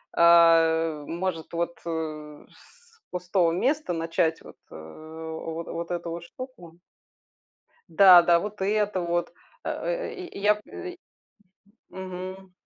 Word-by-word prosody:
а, 165 -2 +5
может 170 0 -4
вот, 170 0 -2
э, 155 -2 -5
с 475 -1 -23
пустого 180 -1 +1
места 270 - 0
начать 165 0 0
вот, - - -14
э, - - -11
во 160 - -7
вот 170 +1 -6
эту 170 -1 -3
вот 170 +1 -6
штуку. 180 -8 -11 1.1
Да, 180 +1 +8
да, 170 0 +4
вот 205 +2 -6
это 205 -1 0
вот, 175 0 -1 0.3
э - - -3
э, - - -3
и 370 -3 -7
и - - -10
я 210 +1 +4
п 360 - -9 0.9
Мгм. 185 0 -8
170 Hz, 130 wpm, -26 LUFS, 165-195 Hz, 1.1 s, Да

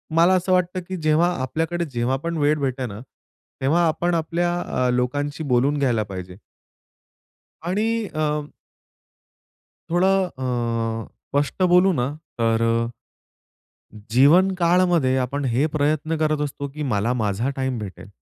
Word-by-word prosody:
मला 170 +3 +5
असं 185 0 +1
वाटतं 180 0 +1
की 185 - -4
जेव्हा 155 +1 +2
आपल्याकडे 165 +6 -2
जेव्हा 120 +2 0
पण 170 -1 -2
वेळ 150 +1 +2
भेटते 130 -2 -2
ना, 105 -3 -7 0.6
तेव्हा 160 +6 +3
आपण 175 +2 0
आपल्या 170 +2 0
अ, 125 -6 -1
लोकांशी 145 +5 -1
बोलून 140 +1 +2
घ्यायला 120 -6 +1
पाहिजे. 95 -2 -8 1.2
आणि 215 +6 -1
अ 155 -1 0 1.6
थोडा 175 +3 +3 0.4
अ, 115 -2 -2 0.2
स्पष्ट 145 +6 0
बोलू 180 +2 +6
ना, - - +1 0.4
तर 115 0 +2 1.5
जीवन 150 - +5
काळामध्ये 170 -6 +3
आपण 140 +3 -2
हे 130 +3 +1
प्रयत्न 155 +2 0
करत 155 -1 +1
असतो 140 0 -5
की 150 - -4
मला 105 +4 +1
माझा 110 +1 -1
टाईम 130 -2 -2
भेटेल. 100 -2 -8
145 Hz, 130 wpm, -22 LUFS, 125-170 Hz, 1.6 s, बोलू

